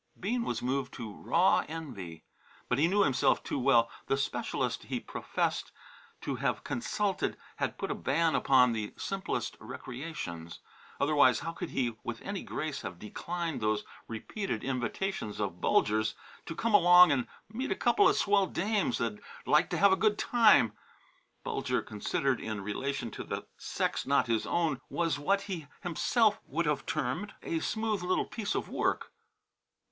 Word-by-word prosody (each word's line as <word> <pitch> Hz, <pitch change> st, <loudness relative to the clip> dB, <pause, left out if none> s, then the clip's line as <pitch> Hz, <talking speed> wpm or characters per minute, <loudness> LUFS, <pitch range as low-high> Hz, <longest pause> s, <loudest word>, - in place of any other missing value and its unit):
Bean 230 Hz, +6 st, 0 dB
was -, -, -3 dB
moved 130 Hz, +1 st, -1 dB
to 115 Hz, -4 st, -6 dB
raw 175 Hz, -, +3 dB
envy. 120 Hz, -, -7 dB, 0.4 s
But 125 Hz, -, +1 dB
he 160 Hz, -, +5 dB
knew 200 Hz, +3 st, +3 dB
himself 135 Hz, -7 st, +2 dB
too -, -, -2 dB
well. 120 Hz, -3 st, +4 dB, 0.2 s
The 135 Hz, -, +2 dB
specialist 135 Hz, -, -2 dB
he -, -, -2 dB
professed -, -, -2 dB, 0.5 s
to -, -, -3 dB
have -, -, -1 dB
consulted 195 Hz, -, -1 dB, 0.2 s
had -, -, -2 dB
put -, -, -3 dB
a -, -, +1 dB
ban 160 Hz, +5 st, +1 dB
upon 125 Hz, -2 st, +5 dB
the 110 Hz, -2 st, -4 dB
simplest 195 Hz, -1 st, -3 dB
recreations. 120 Hz, -, -7 dB, 0.4 s
Otherwise 140 Hz, -4 st, +4 dB
how 165 Hz, 0 st, -3 dB
could 170 Hz, +1 st, -6 dB
he 120 Hz, -4 st, -1 dB
with 115 Hz, -1 st, -4 dB
any 200 Hz, -1 st, -4 dB
grace 155 Hz, -2 st, -4 dB
have 90 Hz, -2 st, -6 dB
declined 165 Hz, -, -4 dB
those 110 Hz, 0 st, +1 dB, 0.2 s
repeated 115 Hz, -, -4 dB
invitations 130 Hz, -, -2 dB
of 95 Hz, -4 st, -3 dB
Bulger's 110 Hz, +1 st, +2 dB, 0.3 s
to 165 Hz, -, -5 dB
come 230 Hz, +5 st, -1 dB
along 180 Hz, -2 st, +8 dB
and 130 Hz, -3 st, +1 dB, 0.2 s
meet 245 Hz, +6 st, -4 dB
a -, -, +2 dB
couple 405 Hz, -2 st, +4 dB
of -, -, +2 dB
swell 200 Hz, -1 st, +3 dB
dames 195 Hz, -, 0 dB
that'd 110 Hz, -3 st, -2 dB, 0.2 s
like 150 Hz, +4 st, +4 dB
to 175 Hz, -, -1 dB
have 200 Hz, +3 st, +6 dB
a -, -, +6 dB
good 210 Hz, -1 st, +3 dB
time? 215 Hz, -, +5 dB, 0.7 s
Bulger, -, -, -1 dB
considered 125 Hz, +5 st, -1 dB
in 110 Hz, -2 st, -4 dB
relation 120 Hz, +4 st, -3 dB
to -, -, -6 dB
the -, -, -5 dB
sex -, -, -2 dB
not 140 Hz, +1 st, +3 dB
his 115 Hz, -2 st, 0 dB
own, 165 Hz, -6 st, 0 dB
was 165 Hz, -4 st, 0 dB
what 195 Hz, +7 st, +2 dB
he 185 Hz, -7 st, -5 dB, 0.2 s
himself 210 Hz, -, +2 dB
would 165 Hz, +4 st, -1 dB
have 150 Hz, -2 st, -1 dB
termed 160 Hz, +11 st, -2 dB
"a 165 Hz, -, -1 dB
smooth 220 Hz, +2 st, -1 dB
little 180 Hz, +1 st, +1 dB
piece 215 Hz, -3 st, -3 dB
of -, -, -1 dB
work." -, -, -1 dB
150 Hz, 160 wpm, -31 LUFS, 120-190 Hz, 0.7 s, along